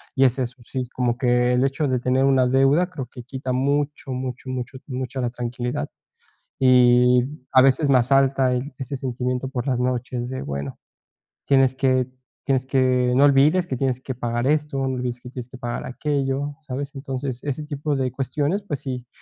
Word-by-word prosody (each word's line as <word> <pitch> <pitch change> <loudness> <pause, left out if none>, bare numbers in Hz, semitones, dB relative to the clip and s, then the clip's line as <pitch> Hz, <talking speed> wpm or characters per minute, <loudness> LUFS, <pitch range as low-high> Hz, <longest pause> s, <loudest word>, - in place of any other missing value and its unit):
y 135 -1 +5
es 130 +1 +2
eso, 125 0 -3
sí, 130 +1 -4
como 120 -1 0
que 125 -1 +2
el 125 +1 +3
hecho 135 +2 0
de 130 -2 +1
tener 130 +2 +2
una 135 -2 +4
deuda 135 +7 +3
creo 145 -8 -6
que 125 -1 -10
quita 130 +1 -4
mucho, 140 +2 -1
mucho, 130 0 -5
mucho, 130 +1 -4
mucha 130 -1 -4
la 120 - 0
tranquilidad, 120 0 -4 0.7
y 125 -1 +5 0.3
a 130 - +7
veces 135 +3 +3
me 135 -2 +6
asalta 135 +1 +3
el, 125 +4 -2
ese 135 +1 -5
sentimiento 125 0 -2
por 130 -1 -4
las 125 -3 0
noches 125 -1 -2
de, 130 0 -4
bueno, 70 -1 -5 0.7
tienes 135 -2 +4
que 130 -1 +2 0.4
tienes 130 -2 +1
que, 130 -2 +2
no 135 - +5
olvides 145 +6 +4
que 130 - -3
tienes 130 -1 -1
que 130 - -4
pagar 120 0 -2
esto, 150 -1 +1
no 135 -1 -1
olvides 125 -1 -4
que 125 - -9
tienes 125 -2 -7
que 130 - -11
pagar 120 -1 -4
aquello, 140 +1 -2
¿sabes? 140 -1 -5
Entonces 135 -2 -4
ese 145 +1 -2
tipo 145 0 -2
de 130 -2 -1
cuestiones, 145 - -1
pues 150 -9 -4
sí, 125 -3 -5
130 Hz, 185 wpm, -23 LUFS, 125-135 Hz, 0.7 s, a